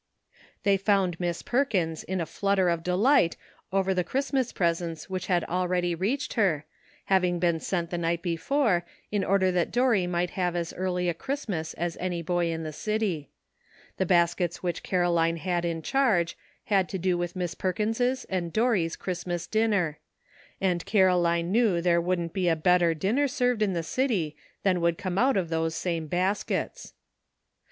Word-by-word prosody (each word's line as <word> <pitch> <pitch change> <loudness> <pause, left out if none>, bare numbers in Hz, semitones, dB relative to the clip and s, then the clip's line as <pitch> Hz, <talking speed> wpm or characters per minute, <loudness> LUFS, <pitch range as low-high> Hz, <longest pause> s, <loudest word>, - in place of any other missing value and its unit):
They 200 -1 +4
found 195 -3 +1
Miss 175 -1 -2
Perkins 190 - 0
in 190 0 -3
a 165 - -1
flutter 195 0 +1
of 170 -1 0
de 180 +2 -1
light 225 -3 +4 0.3
over 190 0 +1
the 180 -1 +1
Christmas 265 +4 -1
presents 170 -1 -2
which 185 -1 -3
had 175 -3 +2
already 180 0 0
reached 210 - -1
her, 175 - +1 0.4
having 180 -2 +2
been 170 -1 +1
sent 170 -1 -2
the 175 - -2
night 170 0 -1
before, 180 - +1 0.3
in 205 -2 0
order 190 -1 +2
that 180 -1 +1
Dorry 240 -7 +2
might 175 0 -1
have 180 -2 -1
as 170 -1 -2
early 180 -1 -1
a 175 - +1
Christmas 185 - -4
as 170 0 -3
any 175 -2 -3
boy 175 0 0
in 165 0 -3
the 155 -1 -5
city. 205 -6 -2 0.7
The 190 - 0
bas 170 -1 +4
kets 175 -2 -2
which 175 -1 -2
Caroline 170 -2 +1
had 175 0 -1
in 165 -1 -2
charge 210 - +2 0.3
had 195 -3 +1
to 195 - -3
do 185 0 +1
with 175 0 -3
Miss 180 -2 -2
Perkins' 225 +7 -1
and 175 -3 -2
Dorry 220 -6 +2
's 165 - -6
Christmas 175 -1 -4
din 220 +1 +1
ner; 175 -8 0 0.6
and 180 -3 0
Caroline 175 -4 +3
knew 215 -5 +3
there 170 0 +3
wouldn't 175 -1 -1
be 190 -3 0
a 165 - +3
better 170 +1 +3
dinner 225 - +1
served 250 -4 0
in 200 -3 +2
the 170 -1 -2
city 185 - -1 0.3
than 185 -3 +2
would 170 -1 +2
come 185 0 -2
out 260 -2 +3
of 175 -4 -1
those 160 0 -1
same 165 -3 -2
baskets. 185 +5 -2
180 Hz, 180 wpm, -27 LUFS, 170-200 Hz, 0.7 s, They